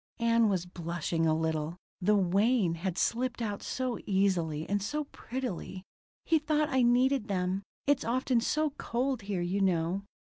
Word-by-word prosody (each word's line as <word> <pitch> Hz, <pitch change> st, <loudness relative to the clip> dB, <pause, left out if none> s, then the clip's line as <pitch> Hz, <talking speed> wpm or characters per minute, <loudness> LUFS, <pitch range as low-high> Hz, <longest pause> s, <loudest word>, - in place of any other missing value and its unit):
Ann 230 Hz, -1 st, +4 dB
was 185 Hz, -3 st, 0 dB
blushing 170 Hz, -1 st, -2 dB
a 155 Hz, -, +3 dB
little: 160 Hz, +1 st, -1 dB, 0.2 s
the 210 Hz, +4 st, +4 dB
"Wayne" 200 Hz, +1 st, +3 dB
had 175 Hz, +2 st, -3 dB
slipped 245 Hz, +1 st, 0 dB
out 210 Hz, -3 st, -3 dB
so 255 Hz, -3 st, -2 dB
easily, 175 Hz, -6 st, +1 dB
and 205 Hz, 0 st, 0 dB
so 295 Hz, +10 st, -2 dB
prettily. 235 Hz, -7 st, -5 dB, 0.4 s
"He 325 Hz, -1 st, +3 dB
thought 305 Hz, 0 st, +1 dB
I 265 Hz, -1 st, +2 dB
needed 250 Hz, 0 st, +3 dB
them. 185 Hz, -1 st, -1 dB, 0.2 s
It's 285 Hz, 0 st, +2 dB
often 250 Hz, 0 st, +1 dB
so 305 Hz, +5 st, +1 dB
cold 250 Hz, +1 st, -1 dB
here, 195 Hz, -3 st, -2 dB
you 185 Hz, +3 st, -1 dB
know." 180 Hz, 0 st, +1 dB
205 Hz, 155 wpm, -30 LUFS, 175-250 Hz, 0.4 s, Ann